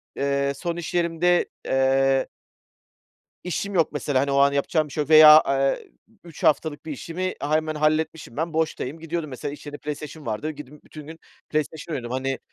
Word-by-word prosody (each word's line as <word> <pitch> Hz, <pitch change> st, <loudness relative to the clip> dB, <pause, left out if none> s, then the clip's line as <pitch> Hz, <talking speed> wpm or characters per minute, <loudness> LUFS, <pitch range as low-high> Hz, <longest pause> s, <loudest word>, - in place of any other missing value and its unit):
eee, 140 Hz, 0 st, 0 dB
son 170 Hz, +4 st, -4 dB
iş 175 Hz, -, -6 dB
yerimde, 175 Hz, 0 st, +2 dB, 0.2 s
eee 135 Hz, 0 st, +2 dB, 1.2 s
İşim 190 Hz, +3 st, -3 dB
yok 165 Hz, -3 st, +2 dB
mesela, 145 Hz, -2 st, -1 dB
hani, 140 Hz, +1 st, 0 dB
o 140 Hz, -, +1 dB
an 140 Hz, 0 st, +5 dB
yapacağım 155 Hz, +2 st, 0 dB
bir 145 Hz, -, -12 dB
şey 150 Hz, -, -1 dB
yok 145 Hz, -, -14 dB
veya, 155 Hz, 0 st, +9 dB
eee, 135 Hz, 0 st, 0 dB, 0.3 s
3 170 Hz, -3 st, -12 dB
haftalık 155 Hz, 0 st, +1 dB
bir 160 Hz, -, -5 dB
işimi 170 Hz, +6 st, -4 dB
a 150 Hz, +2 st, 0 dB
hemen 155 Hz, 0 st, -1 dB
halletmişim, 155 Hz, -2 st, -1 dB
ben 165 Hz, +1 st, -2 dB
boştayım. 160 Hz, -2 st, -2 dB
Gidiyordum, 165 Hz, -1 st, -4 dB
mesela 140 Hz, +2 st, -5 dB
içeride 145 Hz, 0 st, -9 dB
PlayStation 150 Hz, +1 st, -7 dB
vardı. 115 Hz, +8 st, -3 dB
Gidip 150 Hz, 0 st, -12 dB
bütün 150 Hz, -2 st, -12 dB
gün 160 Hz, +1 st, -10 dB, 0.3 s
PlayStation 155 Hz, +1 st, -3 dB
oynuyordum, 120 Hz, -3 st, -5 dB
hani, 135 Hz, 0 st, -3 dB
150 Hz, 175 wpm, -24 LUFS, 140-160 Hz, 1.2 s, veya